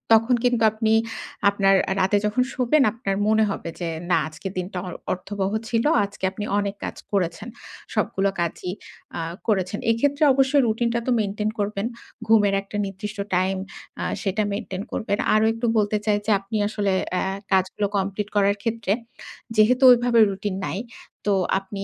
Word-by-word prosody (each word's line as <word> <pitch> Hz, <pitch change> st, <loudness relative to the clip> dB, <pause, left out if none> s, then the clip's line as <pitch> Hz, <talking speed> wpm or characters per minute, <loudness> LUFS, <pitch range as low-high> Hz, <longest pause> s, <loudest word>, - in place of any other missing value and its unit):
তখন 225 Hz, +3 st, +3 dB
কিন্তু 245 Hz, -2 st, +2 dB
আপনি 220 Hz, 0 st, +1 dB, 0.6 s
আপনার 195 Hz, -1 st, +3 dB, 0.2 s
রাতে 195 Hz, +2 st, +3 dB
যখন 215 Hz, +4 st, +2 dB
শোবেন 265 Hz, +3 st, +3 dB
আপনার 215 Hz, -4 st, -3 dB
মনে 220 Hz, 0 st, +4 dB
হবে 180 Hz, -, -4 dB
যে, 170 Hz, -2 st, -2 dB, 0.2 s
না -, -, +4 dB
আজকের 155 Hz, +5 st, -7 dB
দিনটা 185 Hz, +1 st, -4 dB, 0.4 s
অর্থবহ 195 Hz, +1 st, -3 dB, 0.2 s
ছিল। 230 Hz, -1 st, +1 dB, 0.2 s
আজকে 200 Hz, -1 st, -8 dB
আপনি 205 Hz, +2 st, -5 dB
অনেক 200 Hz, 0 st, -2 dB
কাজ -, -, -4 dB, 0.2 s
করেছেন। 195 Hz, +1 st, -1 dB, 0.5 s
সবগুলো 195 Hz, +1 st, +1 dB
কাজই 170 Hz, +1 st, -2 dB, 0.5 s
আ -, -, -2 dB, 0.3 s
করেছেন। 200 Hz, -2 st, 0 dB
এক্ষেত্রে 285 Hz, +6 st, +1 dB
অবশ্যই 270 Hz, +2 st, +3 dB
রুটিন 230 Hz, +2 st, +1 dB
টা 235 Hz, -, +1 dB
তো -, -, +2 dB
মেইনটেইন 210 Hz, +1 st, -1 dB
করবেন। 205 Hz, 0 st, -1 dB, 0.4 s
ঘুমের 210 Hz, -3 st, +4 dB
একটা 195 Hz, +1 st, -7 dB
নির্দিষ্ট 205 Hz, +2 st, -6 dB, 0.2 s
টাইম 185 Hz, +1 st, +1 dB, 0.5 s
আ -, -, -1 dB, 0.2 s
সেটা 210 Hz, 0 st, 0 dB
মেইনটেইন 200 Hz, -2 st, -4 dB
করবেন। 205 Hz, -3 st, -1 dB, 0.2 s
আরো 215 Hz, +1 st, +4 dB
একটু 230 Hz, +2 st, -3 dB
বলতে 210 Hz, 0 st, +2 dB
চাই 210 Hz, -1 st, +3 dB
যে, 220 Hz, -, +1 dB
আপনি 200 Hz, +3 st, -4 dB
আসলে 205 Hz, -2 st, -1 dB, 0.2 s
অ্যা 180 Hz, -, +1 dB, 0.3 s
কাজগুলো 190 Hz, +2 st, +1 dB
কমপ্লিট 195 Hz, +1 st, -2 dB
করার 200 Hz, 0 st, +3 dB
ক্ষেত্রে, 230 Hz, -4 st, 0 dB, 0.6 s
যেহেতু 240 Hz, +5 st, +4 dB
ওইভাবে 240 Hz, -1 st, +4 dB
রুটিন 195 Hz, 0 st, -3 dB
নাই। 190 Hz, -, -3 dB, 0.5 s
তো 205 Hz, -, +4 dB, 0.3 s
আপনি 195 Hz, +1 st, -7 dB
205 Hz, 160 wpm, -23 LUFS, 195-225 Hz, 0.6 s, মনে